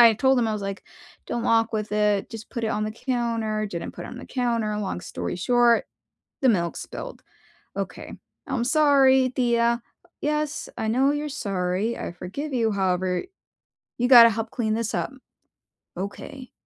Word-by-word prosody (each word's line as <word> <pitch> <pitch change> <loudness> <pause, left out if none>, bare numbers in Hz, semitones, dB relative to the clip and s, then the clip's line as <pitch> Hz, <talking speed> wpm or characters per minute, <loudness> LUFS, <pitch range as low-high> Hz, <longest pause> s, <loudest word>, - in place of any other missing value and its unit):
and 235 - +11
I 225 - +6
told 265 +3 +3
him, 235 - +2
I - - 0
was 210 -1 -3
like, 195 0 -5 0.4
"Don't 235 - -2
walk 225 0 +2
with 215 -1 -2
it. 210 -1 +1
Just 225 -1 -9
put 235 -3 -4
it - - 0
on 215 0 -1
the 215 - -3
counter." 230 -3 -1
Didn't 175 -4 -5
put - - -8
it - - -8
on - - -8
the - - -9
counter. 230 -4 -1
Long 195 -3 -3
story - - -4
short, 240 +5 +3 0.6
the 260 - +5
milk 170 -5 0
spilled. - - -7 0.5
Okay. - - -5 0.3
"I'm 265 -4 -1
sorry, 270 -2 +5
Tia." 235 -1 +1 0.4
"Yes, 300 0 -1
I 220 - -2
know 260 +5 +3
you're 295 +1 -2
sorry. 195 -2 -1
I - - -5
forgive 235 - -6
you, 230 -3 +2
however, 185 -2 0 0.8
you 245 - +2
gotta 235 -3 +10
help 225 +1 -3
clean 220 -4 -1
this 230 0 -2
up." - - -1 0.9
"Okay." 200 +7 -7
230 Hz, 175 wpm, -25 LUFS, 210-255 Hz, 0.9 s, and